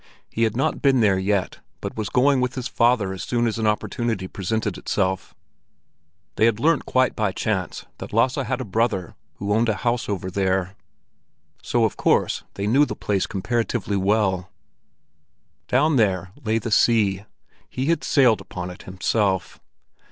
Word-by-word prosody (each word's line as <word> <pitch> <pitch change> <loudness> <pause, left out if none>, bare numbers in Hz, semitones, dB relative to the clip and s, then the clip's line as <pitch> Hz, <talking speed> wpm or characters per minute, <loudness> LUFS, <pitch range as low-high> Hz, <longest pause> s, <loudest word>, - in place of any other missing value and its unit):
He 115 - +1
had 110 +1 -2
not 135 - 0
been 135 -2 +4
there 100 -3 +3
yet, 95 0 -1 0.2
but - - -6
was 110 -2 -3
going 135 +1 +3
with 125 0 -1
his 125 -2 -3
father 115 -5 +2
as 95 - -7
soon 120 -1 0
as 115 -1 -1
an 110 - +1
opportunity 105 -2 -1
presented 105 +2 -2
itself. 95 -2 -2 1.0
They 110 - +4
had 115 -2 +2
learnt 155 +2 +2
quite 130 0 +2
by 105 -4 0
chance 95 -2 -3
that - - -7
Lasse 120 +5 +2
had 125 +1 -2
a 130 - -4
brother 105 -3 -1 0.2
who 100 +1 -2
owned 115 +2 +2
a 110 - +1
house 120 +2 -1
over 95 -2 -3
there; 95 0 0 0.9
so - - +1
of - - -2
course - - +1
they 100 - -3
knew 130 +8 +4
the - - -4
place 100 -3 -1
comparatively 115 +1 -1
well. 95 -2 +1 1.2
Down 145 +3 +3
there 95 -5 +1
lay 110 0 +1
the 115 0 -4
sea; 105 -3 +3 0.4
he 130 - -3
had 165 +2 +1
sailed 125 -7 +4
upon 90 0 -6
it 90 - -11
himself! 95 0 -1
110 Hz, 165 wpm, -23 LUFS, 95-120 Hz, 1.2 s, been